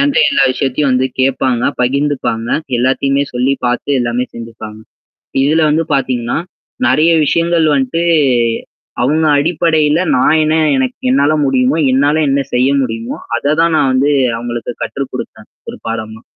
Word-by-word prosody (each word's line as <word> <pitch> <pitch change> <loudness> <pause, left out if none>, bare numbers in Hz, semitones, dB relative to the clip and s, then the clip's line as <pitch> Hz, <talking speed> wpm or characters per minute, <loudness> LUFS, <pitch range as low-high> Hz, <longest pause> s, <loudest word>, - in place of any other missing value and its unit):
என்ட்ட 280 0 +2
எல்லா 280 - +2
விஷயத்தையும் 135 +2 -1
வந்து 130 +1 +1
கேட்பாங்க. 130 -2 0 0.2
பகிர்ந்துப்பாங்க. 130 -3 -1 0.3
எல்லாத்தையுமே 135 +2 +1
சொல்லி 125 +2 0
பாத்து 120 +3 -1
எல்லாமே 120 +1 -1
செஞ்சுப்பாங்க. 115 -2 -9 0.7
இதுல 155 +4 +2
வந்து 160 +2 +1
பாத்தீங்கன்னா. 125 -3 -1 0.5
நெறைய 160 +2 +3
விஷயங்கள் 170 +1 +1
வந்துட்டு, 135 +4 0 1.0
அவங்க 155 +6 +1
அடிப்படையில 160 0 +1 0.2
நான் 155 +5 +3
என்ன 155 +1 +1 0.2
எனக்கு 130 -1 -2
என்னால 140 +3 +2
முடியுமோ? 135 +3 +1 0.2
என்னால 145 +3 +2
என்ன 140 +1 +1
செய்ய 125 +2 +2
முடியுமோ? 115 -2 -4 0.2
அத 145 +4 0
தான் 165 -1 +2
நான் 130 - +2
வந்து 135 +3 +2 0.3
அவங்களுக்கு 120 0 -5
கற்று 140 0 -4
குடுத்தேன். - - -8 0.2
ஒரு - - -8
பாடமா. 110 -1 -5
135 Hz, 135 wpm, -14 LUFS, 125-150 Hz, 1.0 s, நெறைய